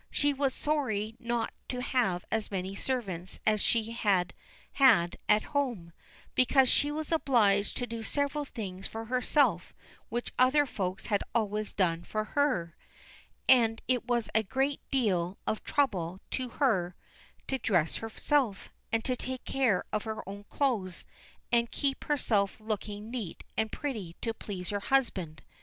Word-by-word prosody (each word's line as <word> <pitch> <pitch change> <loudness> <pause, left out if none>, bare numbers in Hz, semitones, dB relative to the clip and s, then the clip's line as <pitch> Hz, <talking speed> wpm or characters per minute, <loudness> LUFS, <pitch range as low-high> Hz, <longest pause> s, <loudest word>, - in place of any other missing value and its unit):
She 290 0 +2
was 275 -1 +1
sorry 240 -8 -1
not 235 -1 -1 0.2
to 250 - -2
have 245 -9 0
as 220 -1 0
many 190 -1 -3
servants 195 -9 -3
as 215 -1 +3
she 225 -1 +1
had 195 -6 +1 0.4
had 225 -11 +5
at 210 0 +5
home, 240 - -1 0.4
because 255 0 +4
she 290 - +3
was 310 +1 -3
obliged 215 -10 +3
to 245 - -1
do 230 -1 -5
several 285 +5 0
things 195 -8 -6
for 225 0 -6
herself 250 - +2 0.3
which 240 +1 -3
other 270 +4 +5
folks 190 -7 -3
had 205 -3 +1
always 215 -1 0
done 170 -4 +1
for 215 +3 -2
her, 215 - 0 0.7
and 230 -3 +5
it 250 -2 +1
was 240 -2 +1
a 220 - +4
great 270 +7 -1
deal 190 -8 +1
of 220 - -1
trouble 190 - 0
to 255 -1 -2
her 190 - +1 0.5
to 265 - -1
dress 175 -8 +1
herself, 225 -1 0 0.2
and 225 0 0
take 255 0 -3
care 250 -9 +2
of 215 +1 -1
her 220 -3 -5
own 200 +1 -7
clothes, 210 -12 -1 0.5
and 235 -1 +3
keep 275 -1 -1
herself 220 -10 +1
looking 215 0 -4
neat 225 -9 -5
and 220 -1 0
pretty 215 - -4
to 225 - -1
please 190 -5 -6
her 205 - -1
husband. 195 - 0
225 Hz, 150 wpm, -30 LUFS, 195-260 Hz, 0.7 s, had